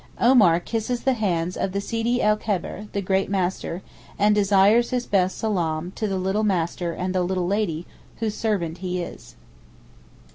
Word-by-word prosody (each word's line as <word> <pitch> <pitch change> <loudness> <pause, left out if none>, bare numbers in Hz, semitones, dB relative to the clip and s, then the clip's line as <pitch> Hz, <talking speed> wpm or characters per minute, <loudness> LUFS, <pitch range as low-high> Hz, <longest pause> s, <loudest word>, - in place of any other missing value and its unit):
Omar 215 -9 +5
kisses 230 +5 -3
the 265 - +3
hands 180 -6 -1
of 190 - -2
the 200 - 0
Sidi 230 +4 -1
el 210 0 +4
Kebeer 210 0 -3
(the 200 - -2
great 190 +1 +1
master), 185 -2 -2 0.3
and 210 +1 +4
desires 205 +3 +4
his 250 -1 -1
best 190 -2 +1
salaam 175 -5 -1
to 215 - -3
the 195 -1 -1
little 190 +3 0
master 175 -3 0
and 185 +2 -3
the 185 - +1
little 180 0 -1
lady, 180 -4 -1 0.3
whose 220 -2 -2
servant 185 -7 -2
he 180 -1 -3
is. - - -10
195 Hz, 170 wpm, -24 LUFS, 180-215 Hz, 0.3 s, Omar